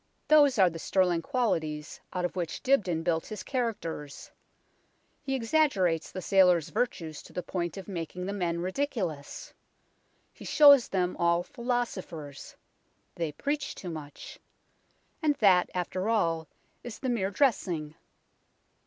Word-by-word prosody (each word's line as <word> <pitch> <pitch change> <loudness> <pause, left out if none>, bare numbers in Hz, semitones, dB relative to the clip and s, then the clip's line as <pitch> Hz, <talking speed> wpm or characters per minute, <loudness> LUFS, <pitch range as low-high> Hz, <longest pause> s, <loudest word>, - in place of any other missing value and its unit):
Those 290 -4 +6
are 190 -2 +6
the 165 - -7
sterling 180 -1 +1
qualities 160 - -2
out 180 -1 -2
of 180 - -4
which 175 -3 -4
Dibdin 190 -12 +2
built 165 -1 0
his 215 -2 -6
characters. 200 - -4 0.9
He 270 -2 -2
exaggerates 225 - +1
the 185 - -6
sailors' 180 -4 +4
virtues 160 -5 -2
to - - -15
the 180 - -4
point 175 0 -3
of 195 - -8
making 180 -1 -5
the 200 - -3
men 170 -4 -1
ridiculous. 185 - -3 0.8
He - - -13
shows 285 -4 +7
them 180 -2 -1
all 170 0 +2
philosophers. 190 - -4 0.6
They 165 -3 -3
preach 285 - -3
too 180 - -7
much. 150 -3 -9 0.8
And 300 -2 +2
that, 190 -6 +4
after 185 +3 -2
all, 165 -8 +1 0.4
is 240 -2 -7
the 265 - -4
mere 225 -6 0
dressing. 185 - 0
185 Hz, 135 wpm, -29 LUFS, 165-235 Hz, 0.9 s, shows